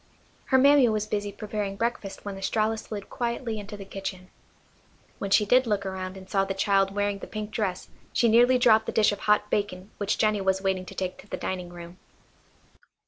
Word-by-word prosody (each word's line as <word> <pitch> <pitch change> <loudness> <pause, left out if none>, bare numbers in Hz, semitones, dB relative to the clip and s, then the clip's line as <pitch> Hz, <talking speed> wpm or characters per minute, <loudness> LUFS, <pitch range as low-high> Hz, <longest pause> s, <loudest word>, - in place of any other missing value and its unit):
Her 260 - +3
mammy 275 -1 +6
was 215 -1 0
busy 205 -1 -2
preparing 205 -1 -4
breakfast 220 -3 -3
when 200 -1 -4
Estralla 215 +3 0
slid 210 -3 -7
quietly 235 -2 -3
into 205 0 -8
the 200 - -9
kitchen. 190 -1 -7 0.9
When 200 - -3
she 210 +2 +4
did 250 +4 +4
look 205 -2 0
around 190 0 -5
and 190 0 -11
saw 195 0 +1
the 195 0 -3
child 195 0 +2
wearing 205 -1 0
the - - -8
pink 215 0 -5
dress 195 -5 -2 0.2
she 235 - +3
nearly 240 +3 +5
dropped 220 -3 +4
the - - -1
dish 215 -1 +4
of 205 - -4
hot 210 0 +2
bacon 200 -1 -2
which 205 0 0
Jennie 215 -2 +2
was 190 0 +1
waiting 190 -1 -1
to - - -10
take 185 -1 -3
to - - -14
the - - -4
dining 180 -2 -4
room. 175 +1 -11
205 Hz, 200 wpm, -26 LUFS, 195-215 Hz, 0.9 s, mammy